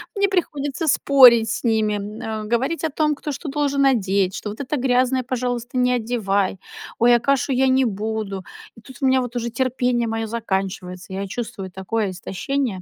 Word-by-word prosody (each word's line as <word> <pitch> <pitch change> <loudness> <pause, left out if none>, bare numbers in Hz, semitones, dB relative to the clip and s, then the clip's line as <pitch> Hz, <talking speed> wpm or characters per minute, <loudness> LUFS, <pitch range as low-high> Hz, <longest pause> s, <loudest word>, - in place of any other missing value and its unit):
мне 400 0 +2
приходится 295 -5 -2
спорить 250 -5 +6
с 235 - -3
ними, 220 -3 +1
м, 215 +1 -5
говорить 265 +9 0
о 320 - +1
том, 300 0 +1
кто 295 +1 -5
что 285 +2 -6
должен 280 -1 +1
одеть, 195 -7 +2
что: 210 - -5
"Вот 210 - -8
это 280 +2 -2
грязное, 255 0 +2
пожалуйста, 245 -1 -3
не 250 0 +3
одевай". 205 -5 -1 0.4
"Ой, 240 +1 +6
а - - +3
кашу 275 +3 +1
я 265 +1 +3
не 260 0 +3
буду!" 210 -2 -3 0.3
И 225 - -14
тут 260 +1 -13
у 270 - +3
меня 260 0 +3
вот 245 0 -6
уже 235 -1 -2
терпение 245 -1 0
мое 225 0 -2
заканчивается. 190 -4 -4
Я 195 +1 -3
чувствую 195 -3 -6
такое 195 +2 -2
истощение. 195 +3 -3
240 Hz, 185 wpm, -22 LUFS, 210-265 Hz, 0.4 s, спорить